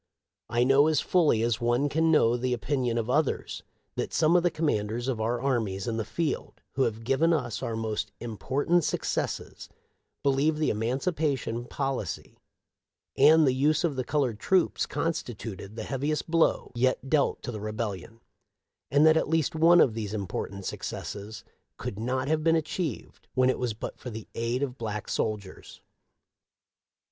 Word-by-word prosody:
" - - -62
* - - -63
I - - +5
know 135 +3 +5
as 155 -1 +3
fully 155 -11 +3
as 115 -1 0
one 120 +4 +2
can 160 +3 +1
know 120 -7 +4
the 125 +1 -1
opinion 125 -1 -1
of 115 -1 -1
others 145 +3 0 0.3
that - - -3
some 160 +2 +4
of 175 - +6
the 175 - +2
commanders 120 -7 -1
of 120 -5 -1
our 120 +2 0
armies 115 -7 -1
in 115 -1 -1
the 110 - -1
field 165 +8 -3
who 135 - -2
have 115 -1 -3
given 135 +7 +2
us 120 -10 -2
our 115 - -2
most 110 -1 -3
im 115 -1 -6
portant 150 - +1
successes - - -3 0.5
believe 140 +3 +2
the 155 - +1
emancipation 130 - -1
policy 135 - -4 0.8
and 155 +3 +6
the 130 - +3
use 150 +5 +2
of 160 -5 0
the 130 - -1
colored 130 -5 0
troops 185 +6 +2
constituted 115 - -4
the - - -5
heaviest 145 +4 -2
blow 165 -1 +2
yet 130 +2 0
dealt 145 0 +1
to - - -4
the 110 -3 -6
Rebellion, 110 0 -5 0.7
and 145 +3 +4
that 160 0 +6
at - - 0
least 160 -2 +1
one 165 +2 +6
of 120 - +5
these 110 -2 -4
important 100 -1 -4
successes 105 +1 -6 0.3
could 100 - -5
not 130 +3 -1
have 155 +1 +1
been 165 0 +4
achieved 160 - -4
when 130 0 +4
it - - -4
was 120 -4 -1
but - - -7
for 125 - -7
the 110 -2 -8
aid 120 +3 -1
of 130 -2 -4
black 105 -2 -4
soldiers. 105 -4 -4
130 Hz, 175 wpm, -28 LUFS, 115-150 Hz, 0.8 s, of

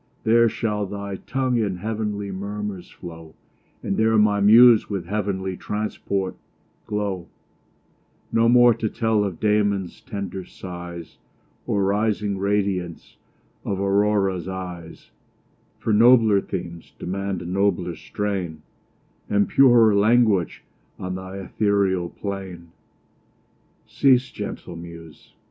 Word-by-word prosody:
There 115 +1 +4
shall 105 -3 -2
thy 100 0 -5
tongue 130 +1 -1
in 100 -4 -1
heav'nly 105 0 -3
murmurs 100 -1 -5
flow, 80 -2 -11 0.5
And 95 - -2
there 110 0 +3
my 105 -1 +3
muse 115 +2 +7
with 95 -4 -3
heav'nly 95 -1 -2
transport 100 -2 -3 0.5
glow: 100 -5 -3 1.0
No 115 0 +3
more 120 0 +6
to 110 -1 -2
tell 110 -2 +1
of 95 -5 -4
Damon's 100 -3 0
tender 95 -2 -6
sighs, 85 -2 -9 0.5
Or 100 -1 +1
rising 105 0 0
radiance 95 -4 -2 0.5
of 95 - -3
Aurora's 100 -2 +1
eyes, 90 -3 -8 0.7
For 110 - -1
nobler 110 -2 +5
themes 85 -3 -7
demand 95 0 -4
a - - -9
nobler 90 -2 0
strain, 90 -3 -4 0.7
And 100 0 +2
purer 120 -5 +5
language 105 -2 +2 0.3
on 90 0 -5
th' 95 +1 -7
ethereal 100 -4 0
plain. 95 -4 -7 1.1
Cease, 130 -2 +2
gentle - - -7
muse! 85 -2 -12
100 Hz, 110 wpm, -23 LUFS, 95-105 Hz, 1.1 s, muse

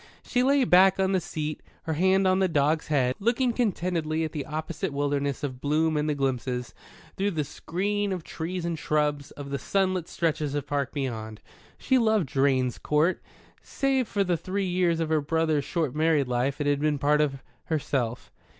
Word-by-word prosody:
She 250 - 0
lay 275 +1 +4
back 190 -3 +5
on 190 0 +2
the 190 -2 +2
seat, 155 -4 -4 0.2
her 160 - -2
hand 190 +4 +3
on 185 0 +3
the 190 - +3
dog's 155 -1 +1
head, 130 -4 +2
looking 235 +3 +1
contentedly 170 -8 0
at 160 - -3
the 145 -3 -5
opposite 155 -1 -4
wilderness 140 -1 -1
of 130 -3 -4
bloom 155 +2 +1
and 150 +1 0
the 150 - 0
glimpses, 125 -3 -2 0.4
through 200 +1 +1
the 160 -6 -1
screen 200 +7 -2
of 180 -3 -3
trees 170 +2 -4
and 170 -2 -2
shrubs, 150 -1 0
of 140 -1 -9
the 140 - -2
sunlit 185 -3 0
stretches 155 -3 -1
of 145 - -2
park 140 -1 -1
beyond. 110 -6 -4 0.4
She 260 -2 +2
loved 220 -5 +2
Drane's 130 -2 +1
Court. 155 +5 +1 0.4
Save 270 -3 0
for 200 -1 0
the 180 -3 0
three 190 +4 -2
years 175 -2 +1
of 165 -1 -1
her 155 -1 +2
brother's 155 -1 0
short 160 -7 -1
married 155 -3 +2
life, 125 +3 -1
it 145 - -1
had 145 -1 +2
been 150 0 +1
part 150 +2 +3
of 135 -3 -1 0.2
herself. 130 -6 -2
155 Hz, 185 wpm, -27 LUFS, 145-185 Hz, 0.4 s, back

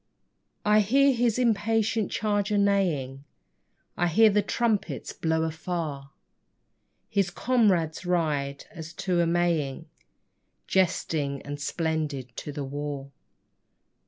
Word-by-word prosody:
I 210 0 +5
hear 270 +7 +4
his 235 -2 +1
impatient 225 -2 +1
charger 205 -1 0
neighing, 170 -10 +1 0.7
I 175 - +1
hear 215 +6 +5
the 210 +1 +3
trumpets 220 0 -1
blow 160 0 0
afar 160 -2 -3
1 - - -21 1.0
His 200 -3 +1
comrades 190 -10 +1
ride, 150 -6 -1
as 165 -3 -9
to 175 -2 0
a 170 - +2
Maying, 165 -5 0 0.8
Jesting 160 -6 0
and 145 0 -6
splendid 150 -6 -2
to 150 - -5
the 145 0 -4
war. 140 0 -5
175 Hz, 110 wpm, -27 LUFS, 145-210 Hz, 1.0 s, I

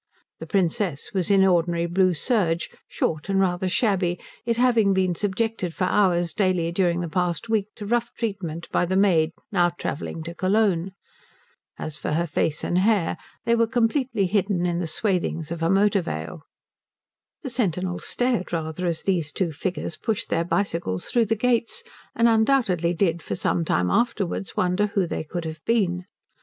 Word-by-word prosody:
The - - -7
Princess 185 -5 0
was 185 -2 0
in 195 -1 +5
ordinary 170 -2 +2
blue 180 +1 +2
serge, 170 - 0 0.2
short 155 +4 -2
and 195 0 +2
rather 185 -1 +1
shabby, 185 -4 +1 0.3
it 230 -1 +1
having 230 -5 +3
been 185 -1 +2
subjected 205 -1 -2
for - - -1
hours 180 -3 +2
daily 185 -5 +1
during 175 -1 +1
the 175 - -3
past 180 +6 -1
week 215 -3 +1
to 205 - -7
rough 235 +2 0
treatment 185 -7 -4
by - - +2
the 185 +2 -1
maid 175 -5 +3 0.2
now 175 -3 +3
travelling 165 -1 -5
to 170 +1 -6
Cologne. 190 -1 +1 0.8
As 155 -1 -6
for - - -2
her 170 +2 +1
face 155 -1 -1
and 175 - +1
hair, 200 -3 +2 0.3
they 235 - +3
were 230 0 +3
completely 235 -2 +1
hidden 195 -1 +1
in 175 -1 0
the 175 - -2
swathings 170 -3 -1
of 170 -1 -4
a 165 - +2
motor 200 +1 +3
veil. 80 - -5 1.0
The 265 - -4
sentinels 185 -6 -1
stared 245 -7 0
rather 165 +1 -2
as 165 -2 -1
these 170 -6 0
two 175 +1 -1
figures 165 +3 -4
pushed 225 -1 -2
their 165 - +1
bicycles 170 - -1
through 235 -2 +3
the 225 +1 +1
gates, 245 - 0 0.3
and 230 - +4
undoubtedly 220 -7 +2
did 170 -2 +1
for - - -4
some 170 - 0
time 90 - +1
afterwards 210 -5 -1
wonder 185 +3 +2
who 200 -2 0
they 165 - -3
could 170 +2 -5
have 160 0 -6
been. 185 -6 +1
185 Hz, 175 wpm, -24 LUFS, 170-210 Hz, 1.0 s, in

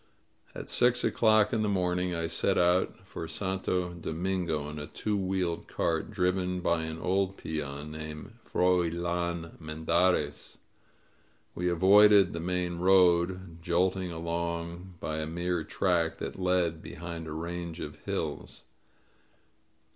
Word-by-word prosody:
At - - -7
six 125 0 +3
o'clock 110 0 +4
in 110 - +1
the 105 - +1
morning 90 -2 0
I 85 0 -1
set 85 +4 +1
out 90 +2 +2
for 95 -4 -6
Santo 90 -1 -2
Domingo 85 -2 -2
in 75 0 -6
a 75 - -5
two 105 -1 -2
wheeled 95 -3 -1
cart 80 -1 -1
driven 90 -2 0
by 85 -2 +1
an 80 0 -4
old 95 +3 0
peon 75 -1 -5
named 75 +5 -7
Froilan 85 -1 0
Mendarez. 80 0 0 1.0
We 90 0 -1
avoided 100 +2 +6
the 85 - -3
main 90 0 -2
road, 90 -1 +3
jolting 90 +1 0
along 85 +2 -4
by 80 - -3
a 75 - -2
mere 85 +1 -1
track 85 -1 0
that - - -6
led 90 -3 +1
behind 85 -1 -7
a - - -6
range 85 +1 -5
of - - -6
hills. - - -4
85 Hz, 130 wpm, -29 LUFS, 80-95 Hz, 1.0 s, avoided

